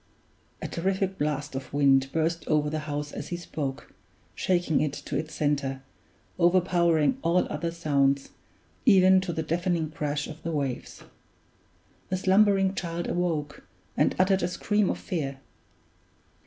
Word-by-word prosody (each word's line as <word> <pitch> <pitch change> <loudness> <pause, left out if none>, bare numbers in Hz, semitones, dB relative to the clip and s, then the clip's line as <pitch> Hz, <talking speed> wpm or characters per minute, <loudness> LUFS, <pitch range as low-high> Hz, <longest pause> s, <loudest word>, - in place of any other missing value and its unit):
A - - -2
terrific 190 +2 -1
blast 150 -1 -2
of 135 0 -6
wind 135 -1 +3
burst 165 +1 -1
over 150 -1 +1
the 155 - -1
house 145 0 -3
as - - -6
he 175 - -4
spoke, 145 -5 -5 0.4
shaking 175 -4 +1
it 150 -2 0
to - - -6
its 155 +2 -3
center, 140 -3 -1 0.6
overpowering 175 - +3
all 175 +2 +2
other 165 +3 -2
sounds, 140 -4 +1 0.5
even 190 -4 +6
to 185 -2 -3
the 160 -1 -2
deafening 170 -1 -1
crash 145 -1 -2
of 155 0 -9
the 165 - -3
waves. 140 -5 -4 1.1
The 185 - 0
slumbering 195 0 +4
child 170 -2 -3
awoke, 160 -5 -2 0.3
and - - +2
uttered 190 +1 +3
a 175 - +1
scream 205 +3 0
of - - -1
fear. 140 -6 -3
165 Hz, 140 wpm, -27 LUFS, 145-180 Hz, 1.1 s, even